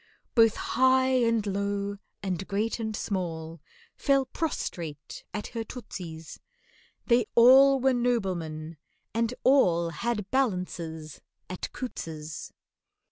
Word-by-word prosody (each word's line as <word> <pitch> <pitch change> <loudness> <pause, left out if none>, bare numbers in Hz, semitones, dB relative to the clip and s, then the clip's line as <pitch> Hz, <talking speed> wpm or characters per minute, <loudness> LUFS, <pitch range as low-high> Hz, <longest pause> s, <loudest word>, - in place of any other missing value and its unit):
Both 225 -2 +5
high 260 0 +3 0.2
and 230 -2 +1
low 200 0 -2 0.3
and 190 -1 -3
great 215 +4 -1
and 220 -1 -3
small 165 -6 -4 0.3
Fell 275 -1 +2
prostrate 170 - -4
at 210 - -4
her 230 -1 -4
tootsies, 175 -10 -8 0.7
They 235 -2 +3
all 265 +3 +8
were 265 +1 +3
noblemen, 180 -10 -1 0.4
and 230 0 +1
all 175 -11 +4
Had 210 0 -3
balances 180 - -2 0.3
at 185 - -5
COUTTS'S. 160 - -6
205 Hz, 105 wpm, -28 LUFS, 170-245 Hz, 0.7 s, all